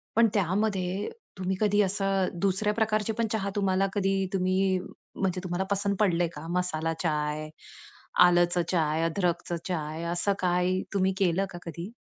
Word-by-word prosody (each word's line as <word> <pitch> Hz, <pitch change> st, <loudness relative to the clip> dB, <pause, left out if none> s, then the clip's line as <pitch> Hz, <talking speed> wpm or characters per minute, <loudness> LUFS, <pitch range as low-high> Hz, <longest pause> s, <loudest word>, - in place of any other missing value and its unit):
पण 230 Hz, 0 st, +6 dB
त्यामध्ये 195 Hz, -, 0 dB, 0.3 s
तुम्ही 190 Hz, 0 st, -1 dB
कधी 210 Hz, -1 st, +4 dB
असं 195 Hz, -1 st, +1 dB
दुसऱ्या 200 Hz, +2 st, +1 dB
प्रकारचे 215 Hz, 0 st, 0 dB
पण 230 Hz, -, +2 dB
चहा 200 Hz, -2 st, -1 dB
तुम्हाला 195 Hz, -1 st, +2 dB
कधी 195 Hz, -1 st, +1 dB
तुम्ही 185 Hz, 0 st, +2 dB, 0.4 s
म्हणजे 185 Hz, -2 st, -1 dB
तुम्हाला 175 Hz, +1 st, -1 dB
पसंत 200 Hz, 0 st, +1 dB
पडलंय 175 Hz, -4 st, +3 dB
का? 150 Hz, +2 st, -7 dB
मसाला 165 Hz, -3 st, -1 dB
चाय, 150 Hz, -1 st, -1 dB, 0.8 s
आलचं 175 Hz, 0 st, +3 dB
चाय, 160 Hz, -2 st, +1 dB
अदरकचं 175 Hz, 0 st, -1 dB
चाय, 160 Hz, -2 st, -3 dB
असं 175 Hz, +4 st, +1 dB
काय 180 Hz, 0 st, +2 dB, 0.2 s
तुम्ही 190 Hz, -1 st, +2 dB
केलं 190 Hz, 0 st, +2 dB
का -, -, -6 dB
कधी? 170 Hz, +5 st, -6 dB
185 Hz, 145 wpm, -28 LUFS, 175-200 Hz, 0.8 s, पण